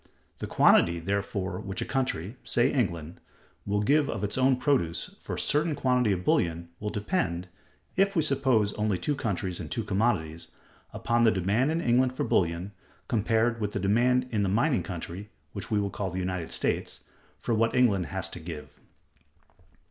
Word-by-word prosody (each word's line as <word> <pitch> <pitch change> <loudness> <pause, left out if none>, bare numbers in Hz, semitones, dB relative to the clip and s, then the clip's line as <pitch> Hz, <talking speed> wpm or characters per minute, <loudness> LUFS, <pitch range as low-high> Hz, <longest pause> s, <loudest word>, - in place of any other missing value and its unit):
The - - -4
quantity, 85 0 +4
therefore, 100 0 -2
which 100 -2 -5
a - - -2
country 125 - -2
(say 120 +3 +2
England) 85 - -2 0.5
will 105 +1 +1
give 145 +5 +3
of 105 - -3
its 105 - -1
own 130 0 +4
produce, 125 - 0
for - - -5
a - - -4
certain 150 +1 +1
quantity 125 -5 +2
of 90 -2 -1
bullion, 85 0 +1
will 105 - -3
depend, 100 - -2 0.5
if 195 +1 +2
we 160 - +3
suppose 130 -8 +2
only 105 -3 0
two 145 - -1
countries 95 -9 -2
and 80 -4 -6
two 115 - -2
commodities, 95 -7 -1 0.4
upon 120 0 0
the 115 - +6
demand 105 - +1
in 165 +1 0
England 125 -1 +2
for - - -2
bullion, 85 +2 0 0.4
compared 115 0 +1
with 105 0 -2
the - - -1
demand 120 +6 +2
in 105 -3 0
the 100 - +1
mining 120 +7 +2
country 90 +3 -6 0.2
(which 100 - -6
we 105 - +2
will 100 -1 -1
call 95 -2 -3
the 90 - -6
United 90 -2 -3
States(272)) - - -1 0.4
for 120 - -2
what 115 +2 +2
England 105 -9 +3
has 95 -1 -2
to - - -8
give. 80 -2 -9
105 Hz, 180 wpm, -28 LUFS, 90-125 Hz, 0.5 s, the